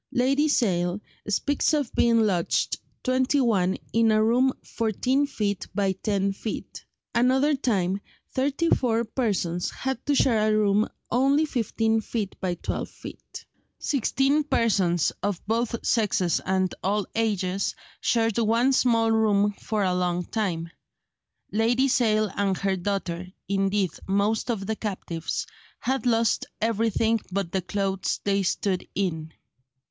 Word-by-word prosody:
Lady 275 Hz, +4 st, +2 dB
Sale 185 Hz, -, +1 dB, 0.3 s
speaks 285 Hz, +9 st, +1 dB
of 285 Hz, -5 st, -2 dB
being 230 Hz, -1 st, +4 dB
lodged 185 Hz, -6 st, +1 dB, 0.2 s
twenty 260 Hz, +2 st, +2 dB
one 195 Hz, -7 st, +2 dB, 0.2 s
in 225 Hz, -1 st, +4 dB
a 215 Hz, 0 st, +4 dB
room 250 Hz, +4 st, +3 dB
fourteen 250 Hz, +5 st, 0 dB
feet 205 Hz, -8 st, -2 dB
by 200 Hz, -2 st, +2 dB
ten 195 Hz, +1 st, -1 dB
feet; 215 Hz, +2 st, -6 dB, 0.3 s
another 265 Hz, +5 st, +3 dB
time 200 Hz, -8 st, 0 dB, 0.3 s
thirty 280 Hz, +5 st, 0 dB
four 230 Hz, -2 st, +2 dB
persons 195 Hz, -8 st, -1 dB
had 265 Hz, -2 st, -4 dB
to 290 Hz, -, +3 dB
share 220 Hz, -5 st, +3 dB
a 215 Hz, -, +3 dB
room 210 Hz, +1 st, +2 dB, 0.2 s
only 275 Hz, +5 st, +3 dB
fifteen 225 Hz, -4 st, 0 dB
feet 210 Hz, -3 st, -4 dB
by 180 Hz, -2 st, -1 dB
twelve -, -, -4 dB
feet; -, -, -11 dB, 0.3 s
sixteen 275 Hz, +2 st, +1 dB
persons, 195 Hz, -, +2 dB
of 200 Hz, -4 st, -1 dB
both 230 Hz, +2 st, 0 dB
sexes 195 Hz, -6 st, +1 dB
and 190 Hz, -1 st, +1 dB
all 205 Hz, +1 st, +1 dB
ages, 200 Hz, -4 st, 0 dB, 0.2 s
shared 225 Hz, -1 st, +1 dB
one 230 Hz, +4 st, +3 dB
small 230 Hz, -3 st, +3 dB
room 210 Hz, -2 st, +3 dB
for 215 Hz, -2 st, -1 dB
a 185 Hz, -1 st, +1 dB
long 180 Hz, -1 st, 0 dB
time. 180 Hz, -7 st, -2 dB, 0.8 s
Lady 235 Hz, +5 st, +2 dB
Sale 215 Hz, -5 st, +2 dB
and 195 Hz, -2 st, 0 dB
her 195 Hz, -1 st, 0 dB
daughter—indeed, 195 Hz, +1 st, -2 dB, 0.2 s
most 200 Hz, +4 st, +1 dB
of 210 Hz, -5 st, -1 dB
the 220 Hz, +2 st, -1 dB
captives—had 210 Hz, +6 st, -4 dB
lost 230 Hz, -1 st, +2 dB
everything 225 Hz, 0 st, +1 dB
but 190 Hz, -2 st, -2 dB
the 190 Hz, -, 0 dB
clothes 195 Hz, +1 st, -2 dB
they 200 Hz, 0 st, +1 dB
stood 185 Hz, 0 st, -1 dB
in. 160 Hz, -5 st, -2 dB
215 Hz, 130 wpm, -25 LUFS, 195-240 Hz, 0.8 s, being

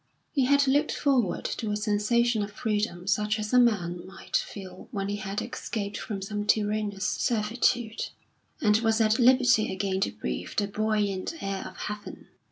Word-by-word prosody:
He 270 Hz, -4 st, +2 dB
had 280 Hz, +2 st, +4 dB
looked 290 Hz, +3 st, +3 dB
forward 255 Hz, -10 st, +1 dB
to 220 Hz, -, -2 dB
a 210 Hz, -, 0 dB
sensation 215 Hz, +2 st, +2 dB
of 205 Hz, 0 st, -3 dB
freedom 210 Hz, -4 st, -2 dB
such 210 Hz, +2 st, +1 dB
as 215 Hz, +2 st, -4 dB
a 250 Hz, -, +7 dB
man 180 Hz, -8 st, +2 dB
might 190 Hz, -, -8 dB
feel 185 Hz, -2 st, -4 dB
when 195 Hz, -1 st, -3 dB
he 205 Hz, -, -2 dB
had 195 Hz, 0 st, -3 dB
escaped 205 Hz, -3 st, -4 dB
from 195 Hz, -3 st, -5 dB
some 205 Hz, +1 st, -3 dB
tyrannous 210 Hz, -1 st, +1 dB
servitude, 235 Hz, 0 st, 0 dB, 0.5 s
and 210 Hz, -1 st, +4 dB
was 225 Hz, -1 st, +2 dB
at 220 Hz, +1 st, +3 dB
liberty 250 Hz, -2 st, +5 dB
again 190 Hz, 0 st, -1 dB
to -, -, +1 dB
breathe 65 Hz, -12 st, -5 dB
the 205 Hz, -, +2 dB
buoyant 210 Hz, -, -1 dB
air 195 Hz, -1 st, -3 dB
of -, -, -12 dB
heaven. 210 Hz, 0 st, -7 dB
210 Hz, 170 wpm, -27 LUFS, 200-230 Hz, 0.5 s, a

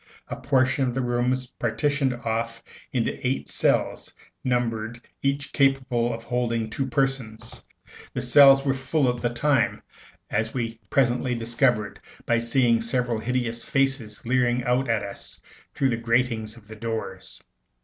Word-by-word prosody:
A -, -, -3 dB
portion 130 Hz, -1 st, +2 dB
of 125 Hz, -, -3 dB
the 130 Hz, -, 0 dB
rooms 125 Hz, +1 st, 0 dB
partitioned 135 Hz, +4 st, 0 dB
off 115 Hz, 0 st, -3 dB, 0.3 s
into 120 Hz, -3 st, -1 dB
eight 130 Hz, +1 st, -1 dB
cells, -, -, 0 dB, 0.3 s
numbered, 115 Hz, -2 st, -1 dB, 0.2 s
each 140 Hz, +1 st, -1 dB
capable 130 Hz, -4 st, +2 dB
of 115 Hz, 0 st, -6 dB
holding 115 Hz, -2 st, -1 dB
two 135 Hz, +4 st, -2 dB
persons. 135 Hz, -4 st, -2 dB, 0.5 s
The -, -, -2 dB
cells 135 Hz, -1 st, +7 dB
were 135 Hz, -, +2 dB
full 135 Hz, +2 st, 0 dB
at 120 Hz, -, -8 dB
the 120 Hz, -, +1 dB
time, 125 Hz, 0 st, +1 dB, 0.5 s
as 110 Hz, +3 st, -1 dB
we 115 Hz, -2 st, -3 dB
presently 125 Hz, -1 st, +2 dB
discovered 115 Hz, -1 st, 0 dB, 0.3 s
by 120 Hz, 0 st, +2 dB
seeing 115 Hz, -1 st, +2 dB
several 120 Hz, 0 st, 0 dB
hideous 120 Hz, -1 st, -2 dB
faces 135 Hz, -6 st, -1 dB
leering 125 Hz, 0 st, +2 dB
out 125 Hz, +2 st, +1 dB
at 115 Hz, -2 st, +1 dB
us 100 Hz, -1 st, -8 dB, 0.3 s
through 135 Hz, -, +1 dB
the 120 Hz, -, 0 dB
gratings 115 Hz, -1 st, 0 dB
of 105 Hz, -3 st, -17 dB
the 110 Hz, -, -9 dB
doors. 115 Hz, 0 st, -5 dB
120 Hz, 145 wpm, -25 LUFS, 115-130 Hz, 0.5 s, cells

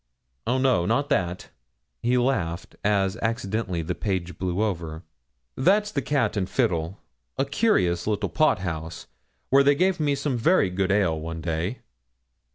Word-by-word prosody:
Oh, 125 Hz, +2 st, +2 dB
no; 130 Hz, -10 st, +2 dB
not 140 Hz, +6 st, +1 dB
that,' 90 Hz, -1 st, -1 dB, 0.5 s
he 125 Hz, +1 st, +2 dB
laughed, 95 Hz, -10 st, -1 dB
as 100 Hz, -2 st, +1 dB
accidentally 110 Hz, -6 st, -2 dB
the 90 Hz, +3 st, -2 dB
page 90 Hz, -3 st, -3 dB
blew 95 Hz, +2 st, 0 dB
over, 85 Hz, -5 st, -3 dB, 0.5 s
'that's 205 Hz, +8 st, +3 dB
the 140 Hz, -, -1 dB
Cat 140 Hz, -3 st, 0 dB
and 95 Hz, -2 st, -1 dB
Fiddle, 95 Hz, -6 st, 0 dB, 0.4 s
a 135 Hz, -, +1 dB
curious 135 Hz, -, +1 dB
little 105 Hz, -2 st, 0 dB
pot 155 Hz, -, +2 dB
house, 80 Hz, -3 st, -5 dB, 0.5 s
where 135 Hz, +1 st, +7 dB
they 140 Hz, +1 st, +4 dB
gave 185 Hz, +3 st, +2 dB
me 145 Hz, -2 st, +1 dB
some 135 Hz, -2 st, -1 dB
very 135 Hz, -, +3 dB
good 95 Hz, +1 st, 0 dB
ale 95 Hz, -6 st, +2 dB
one 80 Hz, +1 st, -5 dB
day.' 85 Hz, +8 st, -3 dB
100 Hz, 155 wpm, -25 LUFS, 85-135 Hz, 0.5 s, where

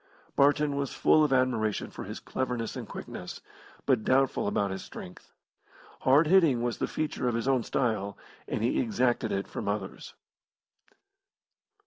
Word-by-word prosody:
Barton 145 Hz, +1 st, +3 dB
was 140 Hz, -1 st, -2 dB
full 155 Hz, -, +5 dB
of 150 Hz, -, +1 dB
admiration 120 Hz, -5 st, +1 dB
for -, -, -7 dB
his -, -, -6 dB
cleverness 125 Hz, -3 st, -3 dB
and -, -, -6 dB
quickness, -, -, -7 dB, 0.5 s
but 110 Hz, -, +2 dB
doubtful 135 Hz, -3 st, +2 dB
about 100 Hz, -1 st, 0 dB
his 95 Hz, -, -5 dB
strength. 90 Hz, -, -11 dB, 0.7 s
Hard 140 Hz, +5 st, +5 dB
hitting 155 Hz, -8 st, +4 dB
was 120 Hz, -1 st, -2 dB
the -, -, 0 dB
feature 155 Hz, -5 st, -2 dB
of 120 Hz, -, 0 dB
his 115 Hz, +2 st, -2 dB
own 130 Hz, -2 st, +3 dB
style, 110 Hz, -4 st, -1 dB, 0.3 s
and -, -, -2 dB
he 120 Hz, -, +1 dB
exacted 120 Hz, -1 st, +1 dB
it 100 Hz, 0 st, -2 dB
from -, -, -5 dB
others. 100 Hz, -2 st, -4 dB
125 Hz, 150 wpm, -29 LUFS, 110-135 Hz, 0.7 s, full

